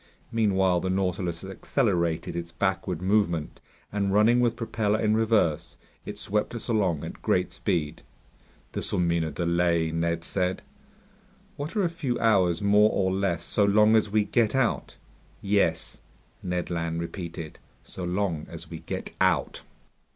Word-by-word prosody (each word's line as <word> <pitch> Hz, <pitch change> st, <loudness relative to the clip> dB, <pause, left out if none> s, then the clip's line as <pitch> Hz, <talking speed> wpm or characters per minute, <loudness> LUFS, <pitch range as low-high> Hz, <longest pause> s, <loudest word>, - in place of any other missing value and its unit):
Meanwhile 95 Hz, -5 st, +2 dB
the 95 Hz, -, -2 dB
Nautilus 90 Hz, -2 st, -1 dB
accelerated 95 Hz, -, -1 dB
its 85 Hz, -1 st, -5 dB
backward 90 Hz, -1 st, -2 dB
movement, 95 Hz, -6 st, 0 dB, 0.3 s
and 100 Hz, -1 st, 0 dB
running 110 Hz, +4 st, +4 dB
with 120 Hz, -1 st, +2 dB
propeller 110 Hz, -2 st, -1 dB
in 110 Hz, -1 st, +2 dB
reverse, 110 Hz, -9 st, +1 dB, 0.3 s
it -, -, -6 dB
swept 105 Hz, +4 st, -2 dB
us 115 Hz, -, -6 dB
along 95 Hz, -, +1 dB
at -, -, -8 dB
great -, -, +1 dB
speed. 80 Hz, -2 st, -2 dB, 0.7 s
"This'll -, -, -1 dB
mean 85 Hz, -2 st, +1 dB
a 80 Hz, -, -2 dB
delay," 85 Hz, +1 st, +1 dB
Ned 85 Hz, 0 st, -1 dB
said. 90 Hz, +1 st, -1 dB, 0.9 s
"What 150 Hz, +7 st, -6 dB
are 205 Hz, -, +2 dB
a 175 Hz, -, +2 dB
few 135 Hz, -8 st, -2 dB
hours 95 Hz, -5 st, +2 dB
more 105 Hz, +1 st, +5 dB
or 95 Hz, -1 st, +1 dB
less, 95 Hz, -4 st, -1 dB
so 105 Hz, -, +1 dB
long 105 Hz, +2 st, +5 dB
as 110 Hz, -1 st, +3 dB
we 105 Hz, +1 st, +2 dB
get 115 Hz, +1 st, +1 dB
out." 130 Hz, -4 st, 0 dB, 0.4 s
"Yes," 100 Hz, -5 st, 0 dB, 0.4 s
Ned 90 Hz, -1 st, -3 dB
Land 85 Hz, -1 st, -2 dB
repeated, 85 Hz, -2 st, -6 dB, 0.2 s
"so 90 Hz, -, -8 dB
long 90 Hz, -3 st, -1 dB
as -, -, -8 dB
we -, -, -6 dB
get -, -, -6 dB
out!" -, -, +1 dB
95 Hz, 150 wpm, -26 LUFS, 85-105 Hz, 0.9 s, more